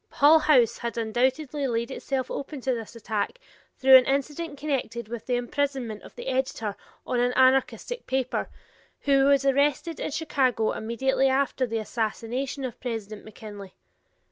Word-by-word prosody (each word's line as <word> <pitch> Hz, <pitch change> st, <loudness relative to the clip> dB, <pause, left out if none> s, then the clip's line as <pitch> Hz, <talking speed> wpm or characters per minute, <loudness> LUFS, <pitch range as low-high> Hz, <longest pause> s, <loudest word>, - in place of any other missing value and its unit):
Hull 300 Hz, +3 st, +6 dB
House 250 Hz, -7 st, +4 dB
had 235 Hz, 0 st, -3 dB
doubtless 250 Hz, +6 st, 0 dB
laid 255 Hz, -4 st, -1 dB
itself 265 Hz, -1 st, -3 dB
open 280 Hz, +1 st, -5 dB
to 260 Hz, +1 st, 0 dB
this 230 Hz, -1 st, -6 dB
attack 220 Hz, -, -3 dB, 0.4 s
through 265 Hz, 0 st, +9 dB
an 255 Hz, -, +3 dB
incident 290 Hz, +3 st, -2 dB
connected 270 Hz, -6 st, -3 dB
with 235 Hz, 0 st, -7 dB
the 250 Hz, -, +1 dB
imprisonment 245 Hz, -3 st, -2 dB
of -, -, -14 dB
the -, -, -8 dB
editor 255 Hz, -6 st, -2 dB, 0.3 s
on 245 Hz, -, -1 dB
an 245 Hz, +1 st, +2 dB
anarchistic 265 Hz, -, +2 dB
paper, 260 Hz, -1 st, -1 dB, 0.5 s
who 275 Hz, -1 st, +3 dB
was 280 Hz, -1 st, +4 dB
arrested 285 Hz, +4 st, +1 dB
in -, -, -2 dB
Chicago 265 Hz, -7 st, +1 dB
immediately 265 Hz, +4 st, 0 dB
after 265 Hz, -1 st, +1 dB
the 225 Hz, 0 st, -2 dB
assassination 235 Hz, +5 st, -3 dB
of 245 Hz, -, -7 dB
President 220 Hz, -4 st, -5 dB
McKinley. 205 Hz, -2 st, -10 dB
260 Hz, 150 wpm, -26 LUFS, 230-275 Hz, 0.5 s, through